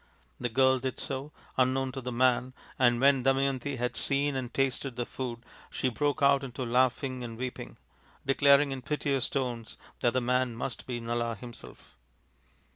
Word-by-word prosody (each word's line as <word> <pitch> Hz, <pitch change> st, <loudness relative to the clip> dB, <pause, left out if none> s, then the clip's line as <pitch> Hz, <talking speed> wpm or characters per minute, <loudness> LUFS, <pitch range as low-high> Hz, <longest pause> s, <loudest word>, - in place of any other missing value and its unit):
The 120 Hz, -, -1 dB
girl 130 Hz, +2 st, +4 dB
did 130 Hz, 0 st, -3 dB
so, 135 Hz, +2 st, -4 dB, 0.3 s
unknown 130 Hz, +1 st, +2 dB
to 135 Hz, 0 st, -6 dB
the 125 Hz, 0 st, -4 dB
man, 125 Hz, +1 st, +2 dB, 0.2 s
and 120 Hz, -2 st, +4 dB
when 135 Hz, 0 st, +5 dB
Damayanti 135 Hz, +1 st, +1 dB
had 125 Hz, 0 st, -2 dB
seen 140 Hz, 0 st, +1 dB
and 130 Hz, -2 st, -3 dB
tasted 135 Hz, -1 st, -1 dB
the 120 Hz, -, -2 dB
food 120 Hz, -3 st, -6 dB, 0.2 s
she 130 Hz, -, -1 dB
broke 145 Hz, +3 st, 0 dB
out 140 Hz, 0 st, +5 dB
into 130 Hz, 0 st, -4 dB
laughing 130 Hz, +1 st, +1 dB
and 115 Hz, -2 st, -6 dB
weeping, 125 Hz, +1 st, -6 dB, 0.5 s
declaring 140 Hz, +1 st, +5 dB
in 135 Hz, -1 st, -4 dB
piteous 140 Hz, -1 st, -1 dB
tones 125 Hz, -4 st, -3 dB, 0.2 s
that 120 Hz, -2 st, +2 dB
the 130 Hz, -, +2 dB
man 125 Hz, 0 st, +1 dB
must 120 Hz, +1 st, -5 dB
be 120 Hz, -2 st, -3 dB
Nala 115 Hz, 0 st, -2 dB
himself. 120 Hz, +3 st, -11 dB
130 Hz, 165 wpm, -29 LUFS, 120-135 Hz, 0.5 s, when